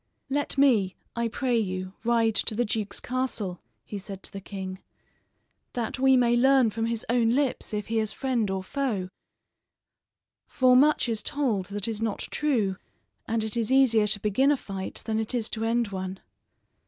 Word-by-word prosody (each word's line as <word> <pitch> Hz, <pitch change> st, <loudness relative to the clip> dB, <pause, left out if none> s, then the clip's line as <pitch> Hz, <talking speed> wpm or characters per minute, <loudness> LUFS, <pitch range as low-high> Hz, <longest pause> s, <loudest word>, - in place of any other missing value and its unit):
"Let 285 Hz, 0 st, 0 dB
me, 225 Hz, -9 st, +4 dB, 0.2 s
I 235 Hz, 0 st, 0 dB
pray 245 Hz, +1 st, 0 dB
you, 185 Hz, -2 st, -3 dB
ride 230 Hz, -1 st, +2 dB
to 215 Hz, -, +1 dB
the 240 Hz, +2 st, +1 dB
duke's 210 Hz, -1 st, -3 dB
castle," 245 Hz, -8 st, -3 dB, 0.2 s
he 205 Hz, -, -6 dB
said 195 Hz, 0 st, -9 dB
to -, -, -4 dB
the 195 Hz, -, -7 dB
king, 190 Hz, -1 st, -6 dB, 0.9 s
"that 240 Hz, +1 st, -3 dB
we 265 Hz, 0 st, +5 dB
may 240 Hz, -1 st, +3 dB
learn 260 Hz, -2 st, +4 dB
from 225 Hz, +1 st, -2 dB
his 230 Hz, -1 st, -2 dB
own 235 Hz, -1 st, +3 dB
lips 265 Hz, +2 st, 0 dB
if 210 Hz, -1 st, -2 dB
he 225 Hz, 0 st, 0 dB
is 215 Hz, -2 st, -1 dB
friend 245 Hz, -6 st, -1 dB
or 190 Hz, 0 st, -2 dB
foe, 210 Hz, -5 st, -2 dB, 1.4 s
for 255 Hz, -1 st, +4 dB
much 290 Hz, +1 st, +4 dB
is 225 Hz, -2 st, -1 dB
told 245 Hz, -11 st, -1 dB
that 205 Hz, +1 st, -4 dB
is 220 Hz, -1 st, -3 dB
not 220 Hz, -3 st, -1 dB
true; 225 Hz, -11 st, 0 dB, 0.5 s
and 225 Hz, -1 st, 0 dB
it 220 Hz, 0 st, -3 dB
is 230 Hz, 0 st, -1 dB
easier 240 Hz, -6 st, +5 dB
to 210 Hz, -1 st, +2 dB
begin 215 Hz, +7 st, +2 dB
a 290 Hz, -, +2 dB
fight 195 Hz, -5 st, -6 dB
than 220 Hz, -1 st, 0 dB
it 220 Hz, +3 st, -1 dB
is 230 Hz, -2 st, -1 dB
to 225 Hz, -, -3 dB
end 230 Hz, -1 st, +1 dB
one." 190 Hz, -1 st, -5 dB
225 Hz, 180 wpm, -27 LUFS, 200-250 Hz, 1.4 s, we